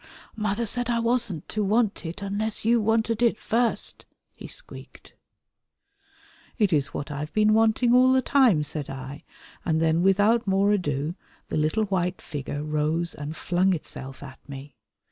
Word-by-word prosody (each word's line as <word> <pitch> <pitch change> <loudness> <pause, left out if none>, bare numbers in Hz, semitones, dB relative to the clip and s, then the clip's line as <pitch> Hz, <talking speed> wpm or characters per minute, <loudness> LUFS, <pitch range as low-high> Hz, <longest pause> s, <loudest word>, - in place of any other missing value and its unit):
"Mother 215 +1 -1
said 245 +2 0
I 235 - +1
wasn't 230 - 0
to 215 - -1
want 210 -3 +1
it 170 +4 -7
unless 210 +2 -2
you 235 0 +4
wanted 225 +1 +1
it 235 -3 +3
first," 235 +1 -1 0.3
he - - -10
squeaked. - - -8 1.4
"It 205 -7 +2
is 145 -3 +2
what 145 - -5
I 145 - -4
have 150 +1 -5
been 215 0 +4
wanting 225 +2 +3
all 255 +1 +6
the 260 0 +3
time," 245 - +4
said 150 -1 -4
I, 135 +2 -8 0.4
and 160 -2 0
then 160 +1 +2
without 205 +4 +3
more 195 +1 +3
ado 150 -6 -1 0.4
the - - -2
little 155 +8 +1
white 180 -2 -1
figure 145 0 -5
rose 155 +3 -1
and 145 +2 -7
flung 185 +2 +1
itself 135 -4 -7
at 135 -1 -11
me. 140 0 -9
195 Hz, 165 wpm, -25 LUFS, 150-225 Hz, 1.4 s, all